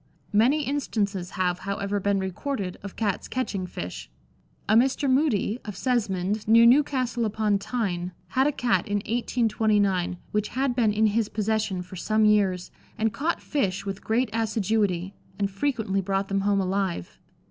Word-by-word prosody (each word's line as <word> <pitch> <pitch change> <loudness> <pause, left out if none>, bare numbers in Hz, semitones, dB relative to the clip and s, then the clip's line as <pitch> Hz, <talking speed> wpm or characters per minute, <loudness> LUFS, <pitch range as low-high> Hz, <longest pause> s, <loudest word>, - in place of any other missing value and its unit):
Many 255 +9 +4
instances 205 -10 -2
have, 180 -1 +1
however, 200 +1 -2
been 200 +1 +1
recorded 190 +1 -3
of 200 -1 -8
Cats 205 -4 -1
catching 205 -8 -2
fish. 65 - -7 0.6
A 215 - +3
Mr. 265 +5 +3
Moody, 260 -5 +2
of 210 -3 -7
Sesmond, 210 -3 -1
near 230 +1 +7
Newcastle 255 -2 +3
upon 215 -2 +1
Tyne, 190 -6 -2 0.2
had 265 +2 +2
a - - +2
Cat 245 -4 0
in 205 - -1
1829 210 -4 +1
which 210 0 0
had 260 -1 -1
been 230 -4 +3
in 215 +1 +2
his 215 0 +1
possession 215 -3 -1
for 180 +1 -10
some 215 +4 +2
years, 195 -4 +2 0.3
and 220 0 0
caught 320 +4 -1
fish 200 -12 -1
with 195 -1 -5
great 225 +1 +1
assiduity, 210 -4 0 0.2
and 200 -1 -1
frequently 200 -3 -1
brought 195 +1 -1
them 195 0 +1
home 200 0 +2
alive. 190 - -2
210 Hz, 155 wpm, -26 LUFS, 195-235 Hz, 0.6 s, near